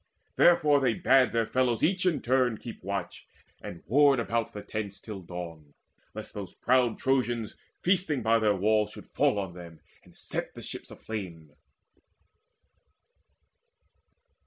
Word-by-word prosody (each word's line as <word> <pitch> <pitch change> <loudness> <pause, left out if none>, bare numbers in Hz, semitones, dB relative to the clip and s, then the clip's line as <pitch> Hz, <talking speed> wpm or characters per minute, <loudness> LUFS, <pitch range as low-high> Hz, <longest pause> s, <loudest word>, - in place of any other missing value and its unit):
Therefore 150 -4 +5
they 125 -5 +1
bade 130 0 +4
their 115 -1 +1
fellows 125 -1 0
each 185 +2 +2
in 170 - 0
turn 125 -2 +2
Keep 115 -3 -10
watch 100 +1 -5 0.3
and 85 - -9
ward 140 +1 +4
about 115 0 -1
the 105 - -8
tents 100 -2 -5
till 105 -4 -8
dawn, 85 -4 -9 0.4
Lest 110 - -7
those 100 -3 -7
proud 125 -2 +2
Trojans 120 -4 0 0.3
feasting 175 - +1
by 115 +1 +3
their 105 -2 +2
walls 105 +2 +2
Should - - -11
fall - - +2
on 95 -3 -3
them, 85 -2 -11 0.2
and - - -18
set - - -4
the - - -9
ships - - -6
aflame. 85 -9 -7
110 Hz, 140 wpm, -28 LUFS, 100-130 Hz, 0.4 s, Therefore